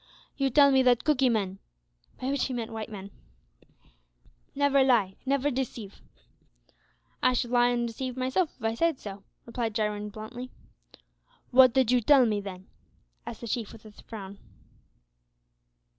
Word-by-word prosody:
"You 275 -1 +1
tell 280 +2 +6
me 265 -1 +5
that 250 -2 +3
Cookee 270 -4 +3
men" 195 -4 -1 0.6
(by 260 +1 -2
which 280 -2 0
he 260 - -4
meant 230 -1 -4
white 220 -1 -5
men) 200 -2 -9 1.4
"never 280 -1 +3
lie, 220 -8 +2
never 280 +1 +1
deceive." 240 -6 -5 1.2
"I 255 - +3
shud 245 -1 -1
lie 245 0 +4
an' 240 -1 0
deceive 250 +2 -5
myself, 260 +7 0
if - - -18
I 225 0 +1
said 330 +5 +1
so," 200 -3 -9 0.2
replied 230 -2 -3
Jarwin, 210 -1 -2
bluntly. 220 +4 -8 1.0
"What 255 -1 +7
did 260 -3 +3
you 250 -1 +3
tell 270 +2 +6
me, 210 -3 0
then?" 190 -2 -8 0.6
asked 225 - -7
the 235 - -6
Chief, 225 -1 -3
with 225 -1 -15
a 215 - -11
frown. 200 -2 -10
240 Hz, 155 wpm, -28 LUFS, 215-260 Hz, 1.4 s, What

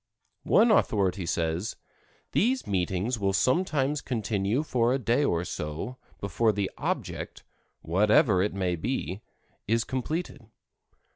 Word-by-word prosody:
One 225 +2 +6
authority 95 - +2
says: 85 +6 -1 0.6
"These 255 +5 +1
meetings 95 +5 -1
will 100 -1 +1
sometimes 140 - +1
continue 110 +1 -1
for 120 -5 +1
a 130 - +2
day 120 +3 +1
or 85 -9 +1
so 80 +12 -5 0.2
before 110 +3 +1
the 100 -2 -2
object, - - -4 0.4
whatever 100 - +4
it 100 +1 -1
may 90 -2 0
be, 100 0 -3 0.5
is 115 +2 +2
completed. 135 -1 -4
110 Hz, 120 wpm, -27 LUFS, 95-130 Hz, 0.6 s, One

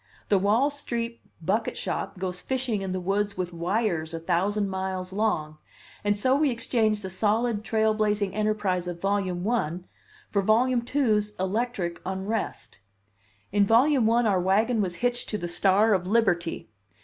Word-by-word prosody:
The 200 - +4
Wall 220 +9 +3
Street 235 -5 -4 0.2
bucket 210 +6 0
shop - - -3
goes 180 -1 -4
fishing 255 -6 -2
in 190 -1 -3
the 185 - -2
woods 200 +2 -1
with 180 -1 -3
wires 170 -2 -1
a - - -4
thousand 190 +5 0
miles 190 -1 -3
long; 155 -8 -1 0.4
and 205 0 +1
so 255 +6 +2
we 295 0 +3
exchange 225 -3 0
the 190 - -5
solid 215 +3 0
trailblazing 215 -2 +1
enterprise 210 -4 0
of 175 -1 -5
Volume 195 -2 -1
One 185 -6 -1 0.5
for 200 - +2
Volume 240 +5 +3
Two's 215 -5 0
electric 190 -2 -2
unrest. 190 - -4 0.7
In 205 0 +4
Volume 240 +3 +4
One 235 +1 +3
our 195 -4 +2
wagon 215 +5 +2
was 180 -3 -2
hitched 245 0 0
to 210 - -2
the 175 -3 -4
star 195 +5 +3
of 180 -2 0
liberty. 180 - +1
205 Hz, 155 wpm, -26 LUFS, 185-225 Hz, 0.7 s, The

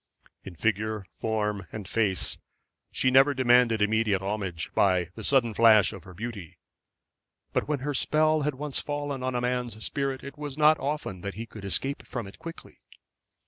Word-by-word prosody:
In 95 - -9
figure, 110 +2 -1
form, 105 -4 -2
and 105 -4 -7
face 100 -5 0 0.5
she 130 - +2
never 135 +2 +5
demanded 120 -3 +4
immediate 105 -2 +1
homage 95 -4 -3
by 90 -3 +2
the 110 - -9
sudden 120 -2 +3
flash 110 -3 +5
of 95 - -10
her 90 -1 -12
beauty. 105 -5 -7 1.0
But - - 0
when 145 -3 -1
her 145 +1 -2
spell 155 +3 +2
had 150 -1 -1
once 145 0 -2
fallen 145 -2 -3
on 130 0 -2
a 120 - 0
man's 125 -3 -2
spirit 135 -2 -2
it 140 +2 -9
was 145 -2 -6
not 155 +1 +5
often 135 -10 -3
that 100 +1 -5
he 115 +2 -5
could 110 -3 -11
escape 135 +8 0
from 120 -3 -6
it 100 - -12
quickly. 165 0 -10
115 Hz, 175 wpm, -27 LUFS, 100-140 Hz, 1.0 s, never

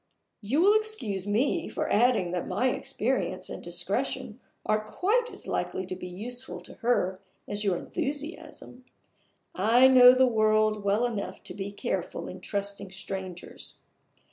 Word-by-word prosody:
You 250 +10 +1
will 415 +3 +6
excuse 225 - -4
me 260 +11 +1
for 305 - -2
adding 215 -6 +3
that 180 -1 -2
my 225 +8 +1
experience - - -2
and - - -6
discretion - - -1 0.3
are 215 0 +1
quite 430 - 0
as - - -9
likely 185 - -2
to 185 0 -5
be 180 0 -7
useful 240 +8 -4
to - - -8
her 190 -6 +1 0.3
as 205 +1 -3
your 190 -4 +1
enthusiasm. 290 - -5 0.7
I 230 +7 +5
know 255 -1 +9
the 260 0 +5
world 215 -2 +2
well 205 +4 +2
enough 200 -5 -4
to - - -6
be 200 0 -5
careful 200 - -3
in - - -8
trusting 200 -1 -3
strangers. 190 -1 -6
215 Hz, 145 wpm, -28 LUFS, 195-255 Hz, 0.7 s, know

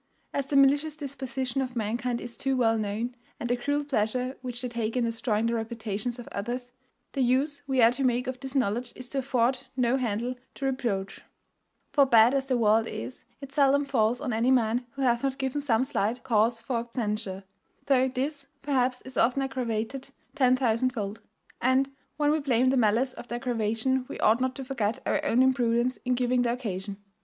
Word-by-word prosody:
As 280 -1 -1
the 280 - -2
malicious 285 +3 +4
disposition 270 -3 -3
of 255 -1 -4
mankind 235 +2 -1
is 240 0 -7
too 270 0 0
well 225 -2 +3
known, 220 +3 -2 0.3
and 240 - -3
the 245 - +2
cruel 285 +4 -1
pleasure 255 0 -1
which 250 -2 -5
they 250 - -3
take 235 -1 -2
in 245 - +2
destroying 230 -1 0
the 230 - +1
reputations 225 0 -3
of 240 - -9
others, 245 +4 -4 0.4
the 275 - -2
use 275 +4 +1
we 265 -3 +3
are 230 - +7
to 260 +3 -2
make 250 0 +2
of 255 -1 -4
this 270 +1 -6
knowledge 240 -1 0
is 255 - -7
to 275 - -1
afford 255 0 0
no 250 +1 +2
handle 240 0 -1 0.2
to 275 - -4
reproach; 235 -8 -2 0.7
for, 280 -2 +5
bad 230 0 +6
as 270 -1 0
the 255 -2 +2
world 225 0 +3
is, 120 - -7 0.2
it 275 0 -9
seldom 280 0 +4
falls 240 -3 +1
on 265 -5 -2
any 230 +3 +2
man 245 -1 +2
who 275 -1 -3
hath 240 -2 +3
not 270 -1 -1
given 270 +1 -2
some 250 -4 +2
slight 245 -3 -1
cause 230 0 +2
for 235 0 -3
censure, 210 -5 -3 0.4
though 265 -2 +4
this, 275 +2 -3 0.2
perhaps, 255 -3 +1
is 260 -1 -9
often 250 +4 +3
aggravated 255 0 -3 0.2
ten 255 -4 +4
thousand 255 -1 +2
fold; 205 -3 -4 0.4
and, 260 +2 +2 0.3
when 295 0 +3
we 310 - +2
blame 255 -3 +2
the - - +2
malice 245 +2 +2
of - - -10
the 240 - -4
aggravation 240 +1 0
we - - -7
ought 225 +3 +4
not 260 0 0
to 270 - -6
forget 230 -5 -1
our 300 - 0
own 255 -3 +3
imprudence 250 -1 +2
in 250 0 +1
giving 250 0 +2
the 240 -1 +1
occasion. 200 -5 -4
250 Hz, 200 wpm, -27 LUFS, 230-265 Hz, 0.7 s, are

